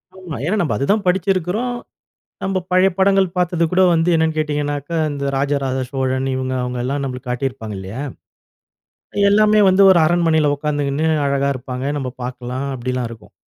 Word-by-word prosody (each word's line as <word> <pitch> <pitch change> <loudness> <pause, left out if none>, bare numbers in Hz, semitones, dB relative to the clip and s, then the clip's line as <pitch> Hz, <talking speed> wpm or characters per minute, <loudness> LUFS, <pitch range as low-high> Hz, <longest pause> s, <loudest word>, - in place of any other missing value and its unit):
ஆமா. 185 -6 -8
ஏன்னா 210 +6 0
நம்ப 150 -10 0
அது 140 - -1
தான் 205 -2 +1
படிச்சிருக்குறோ, 185 +3 +1 0.8
நம்ப 190 -1 -1
பழைய 185 +1 +5
படங்கள் 195 0 +4
பார்த்தது 175 -1 +1
கூட 185 +1 +3
வந்து 165 +1 +2
என்னன்னு 160 -1 +1
கேட்டிங்கனாக்க. 145 -1 -2 0.2
இந்த 140 -1 -4
ராஜ 140 +1 0
ராஜ 130 0 -1
சோழன் 130 0 -1
இவங்க 130 0 -2
அவங்களாம் 125 +3 -2
நம்மளுக்கு 125 -2 -5
காட்டிருப்பாங்க 125 -4 -3
இல்லையா? 95 +7 -6 1.3
எல்லாமே 215 +1 +4
வந்து 190 +2 +4
ஒரு 175 - +5
அரண்மனைல 160 -2 +2
உக்காந்துக்கினு 145 0 -1 0.2
அழகா 140 0 +1
இருப்பாங்க, 130 +1 -5
நம்ம 130 -2 -3
பாக்கலாம் 125 +1 -5
அப்டிலாம் 125 -1 -3
இருக்கும். 110 -2 -13
145 Hz, 150 wpm, -19 LUFS, 130-180 Hz, 1.3 s, பழைய